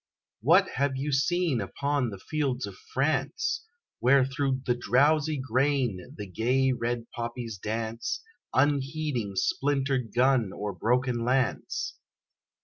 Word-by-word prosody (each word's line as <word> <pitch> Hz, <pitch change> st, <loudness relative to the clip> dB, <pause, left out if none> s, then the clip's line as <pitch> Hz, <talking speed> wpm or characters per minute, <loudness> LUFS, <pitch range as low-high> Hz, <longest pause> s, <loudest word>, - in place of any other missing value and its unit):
What 170 Hz, -, +5 dB
have 140 Hz, 0 st, +1 dB
you 145 Hz, +2 st, -2 dB
seen 150 Hz, -1 st, +1 dB
upon 140 Hz, +6 st, -1 dB
the 100 Hz, -, -7 dB
fields 135 Hz, +2 st, -2 dB
of 100 Hz, -, -7 dB, 0.2 s
France, 145 Hz, -, 0 dB, 0.4 s
Where 130 Hz, +2 st, +5 dB
through 135 Hz, -1 st, -1 dB
the 120 Hz, -, +3 dB
drowsy 145 Hz, +5 st, +2 dB
grain, 130 Hz, -6 st, 0 dB
the 105 Hz, -, -5 dB
gay 125 Hz, +7 st, +1 dB
red 120 Hz, -1 st, -2 dB
poppies 120 Hz, -3 st, -5 dB
dance, 110 Hz, -, -3 dB, 0.3 s
Unheeding 140 Hz, -5 st, 0 dB
splintered 135 Hz, +1 st, 0 dB
gun 125 Hz, -4 st, +3 dB
or 105 Hz, 0 st, -4 dB
broken 120 Hz, +5 st, +1 dB
lance? 125 Hz, 0 st, 0 dB
130 Hz, 120 wpm, -28 LUFS, 115-140 Hz, 0.4 s, What